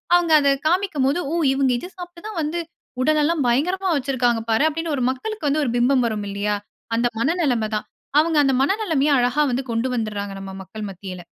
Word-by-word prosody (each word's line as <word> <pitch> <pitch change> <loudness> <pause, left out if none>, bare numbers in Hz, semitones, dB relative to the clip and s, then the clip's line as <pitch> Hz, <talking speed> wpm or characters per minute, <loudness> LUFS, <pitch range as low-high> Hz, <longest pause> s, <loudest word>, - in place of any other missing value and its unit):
அவுங்க 345 -2 +2
அத 280 -1 +3
காண்பிக்கும் 345 -5 +1
போது 285 +5 +1
ஓ! - - +1 0.2
இவுங்க 270 -1 +2
இத 360 - -8
சாப்பிட்டு 350 0 -10
தான் 425 -6 -4
வந்து 310 +3 -2 0.4
உடல் 305 +2 +3
எல்லாம் 310 -3 +1
பயங்கரமா 360 +11 +1
வைச்சி 275 -1 -1
இருக்காங்க 240 -2 +2
பாரு, 225 +6 +3
அப்பிடின்னு 320 0 -2
ஒரு 255 - -1
மக்களுக்கு 365 +6 -4
வந்து 300 +2 +1
ஒரு 240 - -1
பிம்பம் 250 +1 +3
வரும் 210 -2 -3
இல்லயா! 205 +1 -1 0.4
அந்த 235 +1 +2
மன 275 +8 +1
நிலைம 240 -7 +1
தான். 210 - -3 0.3
அவுங்க 320 0 +2
அந்த 270 -1 +2
மன 335 +8 +2
நிலைமைய 300 -6 +1
அழகா 250 +5 +2
வந்து 255 +2 -1
கொண்டு 230 +3 0
வந்துர்றாங்க. 210 -3 -3
நம்ம 195 0 -7
மக்கள் 215 +2 -7
மத்தியில. 185 -2 -8
275 Hz, 205 wpm, -22 LUFS, 230-320 Hz, 0.4 s, அத